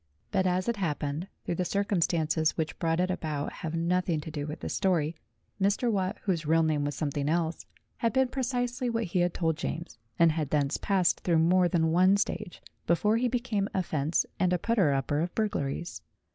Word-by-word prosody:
But, 190 -2 +2
as 185 +2 0
it 235 -2 0
happened, 155 -2 -2 0.2
though - - -1
the 180 - -1
circumstances 165 -5 +1
which 160 -1 -3
brought 165 0 +1
it 185 +1 +1
about 150 -5 -3
have 160 0 -5
nothing 170 0 +1
to 155 - -7
do 145 -1 -4
with 150 - -6
this - - -3
story, 170 -4 +1 0.5
Mr. 205 +5 +2
Watt 195 0 -1
(whose 175 -5 0
real 160 +2 +3
name 155 -2 +1
was 145 -1 -2
something 145 -1 -1
else) 165 0 -1 0.3
had 230 - +1
been 260 -1 +2
pre 265 - -3
cisely 245 0 -1
what 230 0 0
he 180 -2 -1
had 175 0 +1
told 160 -3 0
James, 155 -7 -5 0.2
and 170 -1 +5
had 155 -3 -2
thence 145 -1 +1
passed 190 -3 +2
through 170 -2 +1
more 175 +3 +4
than 160 -2 +1
one 185 +4 +5
stage 190 -3 -3 0.2
before 210 +6 +3
he 250 +2 +1
became 235 -5 -1
a 190 - +1
fence 155 0 0
and 185 -1 +2
a - - +3
putter 195 -5 +2
up 135 +1 -1
of 160 +5 0
burglaries. 175 -7 -2
170 Hz, 200 wpm, -29 LUFS, 155-195 Hz, 0.5 s, and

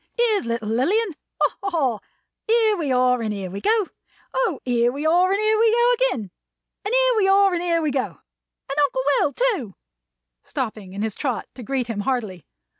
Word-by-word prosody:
"Here's 445 - +1
little 230 -2 -2
Lilian! 365 - +1 0.3
Ha, - - +2
ha, 395 - -2
ha! 270 - 0 0.5
Here 445 -1 +3
we 310 -7 -2
are 250 -1 +3
and 220 -2 -2
here 195 -3 -5
we 200 +1 -6
go! 435 - +1 0.4
O, 470 - 0
here 240 -1 +2
we 285 +4 -5
are 355 +4 +4
and 395 - +1
here 430 0 +2
we 450 0 +4
go 475 +2 +4
again! 455 - -1 0.5
And 410 - -3
here - - +4
we 400 -3 +3
are 390 0 +4
and 345 - -1
here 335 -2 +1
we 300 - 0
go! 265 -2 +1 0.6
And 275 +2 -2
Uncle 260 -2 0 0.2
Will, 285 - +1
too!" 395 - -1 0.7
Stopping 215 -6 -5
in 200 +2 -3
his 220 -2 -2
trot 255 -1 -3
to 255 - -10
greet 255 +1 -2
him 230 -3 -4
heartily. 210 -7 -3
285 Hz, 195 wpm, -22 LUFS, -, 0.7 s, are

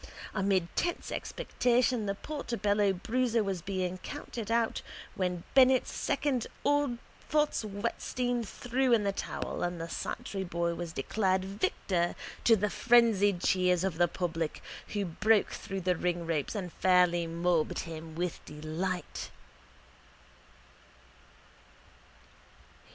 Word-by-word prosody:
Amid 190 -3 +1
tense 345 - -1
expectation 245 - +1
the 200 - 0
Portobello 210 -7 0
bruiser 230 +4 +1
was 195 -3 -2
being 185 0 -2
counted 225 +3 -6
out 230 0 +1 0.3
when 180 -2 -2
Bennett's 260 -1 +5
second 265 -5 0 0.2
Ole 290 -4 +2 0.3
Pfotts 300 -5 +2
Wettstein 240 +4 -2
threw 245 +4 0
in 220 -3 +4
the 200 - +1
towel 195 - -4
and 175 -1 -1
the 165 - -4
Santry 195 +3 -4
boy 170 -1 -1
was 170 0 -5
declared 185 +6 0
victor 190 -3 0 0.3
to 230 - +7
the 210 0 0
frenzied 215 -6 +4
cheers 180 -1 +3
of 185 -4 -1
the 175 - +5
public 165 -2 -3 0.2
who 205 -2 -2
broke 210 +5 +2
through 195 -1 -5
the 180 0 +2
ringropes 170 -2 -1
and 180 -4 -4
fairly 180 -2 +3
mobbed 170 -1 +1
him 160 -1 -8
with 175 0 -3
delight. 160 +5 -4
190 Hz, 120 wpm, -31 LUFS, 175-230 Hz, 0.3 s, to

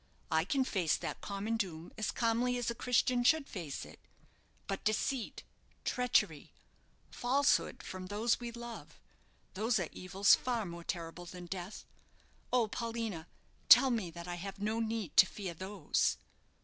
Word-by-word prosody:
I 160 +1 +3
can 265 +6 +2
face 185 -10 +1
that - - -5
common 205 +3 -2
doom 170 -6 -4
as 215 - -2
calmly 240 +2 +1
as 240 -1 -1
a - - -3
Christian 250 +1 +2
should 300 +2 +4
face 165 -8 -5
it. - - -14 0.7
But 195 - -4
deceit, 220 +3 -1 0.4
treachery, 250 0 +1 0.6
falsehood 275 +4 +2
from 185 0 -6
those 215 +4 +1
we 240 -1 -5
love 235 0 -9 0.5
those 215 +3 +1
are 175 - -2
evils 190 +2 +3
far 240 -4 +1
more 170 -1 -7
terrible 170 0 -5
than 180 0 -8
death. 185 +3 -6 0.7
Oh, 245 -3 +3
Paulina! 225 -7 -4 0.4
tell 265 - +9
me 220 -7 -1
that 170 +1 -9
I 175 0 -4
have 195 +1 -6
no 215 +2 -1
need 220 -6 -2
to 190 - +9
fear 190 -4 -5
those?" 190 -1 0
210 Hz, 150 wpm, -33 LUFS, 180-235 Hz, 0.7 s, tell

